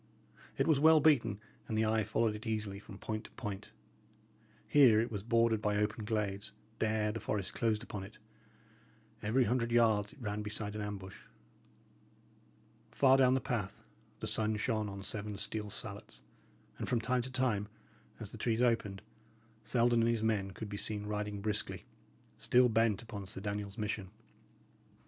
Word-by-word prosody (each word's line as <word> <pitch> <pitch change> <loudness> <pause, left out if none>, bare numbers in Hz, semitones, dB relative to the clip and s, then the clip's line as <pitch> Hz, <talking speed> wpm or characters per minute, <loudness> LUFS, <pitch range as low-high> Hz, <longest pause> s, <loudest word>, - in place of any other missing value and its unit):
It - - +2
was 155 -4 +4
well 160 +1 +7
beaten, 140 -9 +3 0.3
and 110 - -2
the 110 - +3
eye 110 0 +2
followed 105 +2 +1
it 105 +2 -7
easily 105 -3 -2
from 100 -1 -11
point 110 +1 -4
to - - -12
point. 105 -5 -6 1.0
Here 130 -7 +6
it 115 +1 0
was 105 -3 -3
bordered 115 0 +2
by 105 -1 +1
open 105 +1 -1
glades; 105 -1 -2 0.3
there 110 -1 +1
the 115 - -4
forest 100 -4 -3
closed 110 -2 0
upon 105 -4 -6
it; 100 +3 -11 1.0
every 115 +5 +2
hundred 120 0 0
yards 110 -3 +3
it - - -18
ran 105 -3 -3
beside 105 0 -4
an 105 - -4
ambush. 100 -2 -7 1.6
Far 135 -1 +5
down 130 -1 +5
the - - +2
path, 120 -7 -3 0.4
the - - -2
sun 110 0 +1
shone 110 -1 -1
on 100 0 -7
seven 105 +1 -4
steel 105 0 -3
salets, - - -5 0.6
and - - -3
from 120 - +2
time 125 +2 +1
to 130 +2 -6
time, 125 -6 +1 0.5
as - - -6
the - - -9
trees 115 -1 +1
opened, 105 -5 +1 0.6
Selden 120 +1 +2
and 115 - +3
his 115 -2 0
men 105 -3 +1
could 105 +3 -7
be 100 0 -5
seen 105 0 -1
riding 105 -1 -3
briskly, 105 +1 -2 0.5
still 125 0 +4
bent 115 -2 +2
upon 105 -4 -7
Sir 95 0 -3
Daniel's 100 0 -4
mission. 105 -3 -3
110 Hz, 165 wpm, -33 LUFS, 105-115 Hz, 1.6 s, well